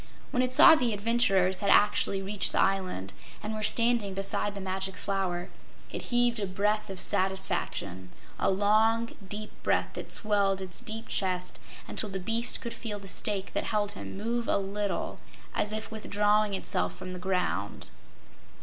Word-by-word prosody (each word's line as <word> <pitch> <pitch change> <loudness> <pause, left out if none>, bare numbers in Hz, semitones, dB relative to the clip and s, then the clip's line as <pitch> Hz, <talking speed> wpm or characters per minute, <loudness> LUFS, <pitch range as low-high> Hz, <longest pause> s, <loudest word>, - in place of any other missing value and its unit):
When 250 - +2
it 255 0 0
saw 320 +5 +9
the 250 -8 +2
adventurers 200 -4 +2
had 200 - 0
actually 200 -1 +4
reached 200 +1 0
the - - +1
island 185 - 0 0.3
and 215 +1 -3
were 215 - -4
standing 230 -2 +1
beside 195 +1 -1
the - - -5
Magic 190 0 -3
Flower, 185 -3 -2 0.4
it - - -4
heaved 240 -1 +3
a 200 - -1
breath 210 +3 0
of 190 -2 -6
satisfaction 190 - -1 0.3
a - - +2
long, 215 +4 +3 0.2
deep 215 +1 -4
breath - - +1
that - - -7
swelled 200 -3 +1
its 185 -2 -5
deep 225 +1 -5
chest 185 -2 -2 0.3
until 215 - -1
the 190 0 -4
beast 225 +5 0
could 235 - -5
feel 215 -3 -5
the 200 -1 -11
stake 195 0 -2
that - - -1
held 205 -1 0
him 200 - -6
move 230 +3 -2
a - - +3
little, 200 +1 -2 0.3
as 210 - 0
if 215 0 -4
withdrawing 210 -1 +1
itself 190 - -1
from 185 0 -7
the 180 - -6
ground. 180 - -2
205 Hz, 170 wpm, -29 LUFS, 190-215 Hz, 0.4 s, saw